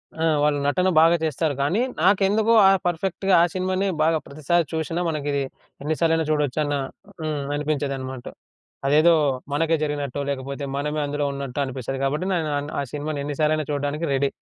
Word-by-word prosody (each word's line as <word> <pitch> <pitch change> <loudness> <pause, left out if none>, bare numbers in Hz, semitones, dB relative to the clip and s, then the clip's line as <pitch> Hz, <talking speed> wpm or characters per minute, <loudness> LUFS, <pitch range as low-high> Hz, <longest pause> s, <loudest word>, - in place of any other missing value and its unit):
ఆ! 160 - -1 0.2
వాళ్ళు 145 -1 +2
నటన 180 +6 +2
బాగా 165 +1 +6
చేస్తారు 155 0 0
గానీ 175 - +1 0.2
నాకెందుకో 205 +3 +3
ఆహ్, 195 - +5
పర్ఫెక్ట్‌గా 190 +3 -1
ఆ - - +5
సినిమానే 185 +1 0 0.2
బాగా 160 0 +3
ప్రతిసారి 155 +4 0
చూషినా 165 +2 -2
మనకిది 145 -2 -1 0.4
ఎన్ని 155 +2 0
సార్లలైనా 165 -1 +2
చూడొచ్చు 150 -1 0
అన్న 145 -1 -1 0.5
హ్మ్. 155 -2 -2
అనిపించేదనమాట. 135 -4 -3 0.6
అదేదో 155 +4 +5 0.4
మనకే 165 +2 +2
జరిగినట్టు 145 -2 -3
లేకపోతే 140 +1 -4
మనమే 150 +2 -2
అందులో 145 0 -2
ఉన్నట్టో 140 0 -5
అనిపిస్తది 130 0 -5
కాబట్టి, 150 +6 0
నేను 160 -4 -1
అన్ 145 - -6
ఆ - - 0
సినిమాని 150 0 -3
ఎన్నిసార్లలైనా 150 +1 0
చూడ్డానికి 145 +3 -2
రెడీ. 135 0 +1
150 Hz, 155 wpm, -23 LUFS, 140-165 Hz, 0.6 s, బాగా